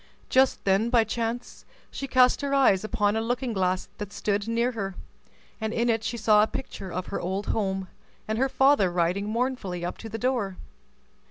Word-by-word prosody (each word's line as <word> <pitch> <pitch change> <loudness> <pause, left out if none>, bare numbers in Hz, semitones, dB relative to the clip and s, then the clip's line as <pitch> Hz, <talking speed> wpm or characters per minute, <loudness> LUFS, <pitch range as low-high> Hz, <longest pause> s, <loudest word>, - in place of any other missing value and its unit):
Just 260 +1 +3
then, 200 +4 +3
by 235 -2 +4
chance, 230 +2 -4 0.3
she 275 - -5
cast 255 +1 +4
her 280 -1 0
eyes 235 -9 +4
upon 210 -1 +1
a 220 - 0
looking 245 +1 -2
glass 185 -2 0
that 205 -1 -5
stood 205 +1 -1
near 235 +2 +1
her, 195 -5 -4 0.7
and 220 0 -1
in 235 +1 +1
it 225 -1 +1
she 235 +1 -3
saw 215 -1 +5
a 215 - +3
picture 195 -7 -6
of 180 +1 -3
her 200 - -3
old 190 +3 -2
home, 190 -3 -1 0.4
and 220 +1 -1
her 270 +1 +2
father 265 -9 +4
riding 180 +4 0
mournfully 220 -7 -2
up 175 - -5
to 225 - -7
the 225 - -4
door. 235 -6 -1
220 Hz, 190 wpm, -26 LUFS, 195-245 Hz, 0.7 s, saw